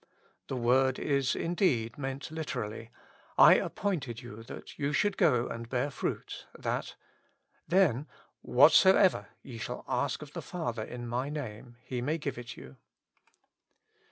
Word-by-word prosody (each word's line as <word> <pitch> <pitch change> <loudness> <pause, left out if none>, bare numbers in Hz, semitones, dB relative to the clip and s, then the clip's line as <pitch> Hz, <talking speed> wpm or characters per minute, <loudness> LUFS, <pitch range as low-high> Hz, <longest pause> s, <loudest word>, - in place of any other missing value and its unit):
The - - -3
word 130 +2 +3
is 140 -3 +1
indeed 165 - 0
meant 135 0 -5
literally: 125 -8 -4 0.3
'* - - -29
I - - +8
ap - - -5
pointed 140 - -2
you 115 -2 -10
that - - -10
ye 140 0 0
should 205 +4 +2
go 120 -5 +3
and 115 0 -6
bear 130 +3 -1
fruit, - - -4
//^a/, - - -3 0.4
" - - -47 0.2
then, 155 -6 +3 0.3
"whatsoever 165 - +5 0.2
ye 120 -4 -9
shall 125 +2 -5
ask 130 +3 -1
of 150 - -13
the - - -5
Father 120 -11 -4
in 120 +1 -7
my 125 +4 -2
name, 120 -5 -7
he 125 -1 -4
may 150 +6 0
give 140 -5 -4
it 120 -1 -8
you." 65 0 -12
130 Hz, 155 wpm, -30 LUFS, 120-150 Hz, 0.4 s, I